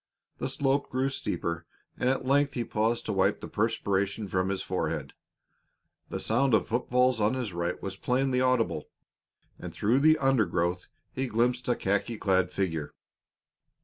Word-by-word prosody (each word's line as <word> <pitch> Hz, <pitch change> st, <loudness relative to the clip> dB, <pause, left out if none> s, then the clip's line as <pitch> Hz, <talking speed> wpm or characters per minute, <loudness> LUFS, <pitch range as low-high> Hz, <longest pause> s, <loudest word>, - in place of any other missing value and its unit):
The -, -, -2 dB
slope 140 Hz, 0 st, 0 dB
grew 130 Hz, +1 st, 0 dB
steeper, 85 Hz, -10 st, -3 dB, 0.3 s
and 125 Hz, -, 0 dB
at 135 Hz, 0 st, 0 dB
length 140 Hz, +1 st, +2 dB
he 120 Hz, -, 0 dB
paused 115 Hz, +1 st, 0 dB
to 105 Hz, -, -1 dB
wipe 95 Hz, +1 st, +2 dB
the -, -, -7 dB
perspiration 100 Hz, -2 st, -1 dB
from 95 Hz, 0 st, 0 dB
his 95 Hz, -1 st, -2 dB
forehead. -, -, -3 dB, 1.0 s
The -, -, -3 dB
sound 120 Hz, +2 st, +2 dB
of 95 Hz, -, +1 dB
foot 120 Hz, +2 st, -1 dB
falls 125 Hz, -2 st, +3 dB
on 105 Hz, +4 st, +2 dB
his 120 Hz, -7 st, -3 dB
right 85 Hz, +1 st, -2 dB
was 95 Hz, -1 st, -5 dB
plainly 125 Hz, +3 st, +1 dB
audible, 130 Hz, -3 st, +1 dB, 0.7 s
and -, -, -6 dB
through 115 Hz, +6 st, +2 dB
the 155 Hz, +2 st, +5 dB
undergrowth 90 Hz, -, +1 dB, 0.3 s
he 135 Hz, 0 st, -2 dB
glimpsed 120 Hz, +2 st, 0 dB
a 120 Hz, -, +3 dB
khaki 100 Hz, +4 st, -1 dB
clad 95 Hz, -3 st, +1 dB
figure. 80 Hz, -7 st, -2 dB
115 Hz, 160 wpm, -28 LUFS, 95-130 Hz, 1.0 s, the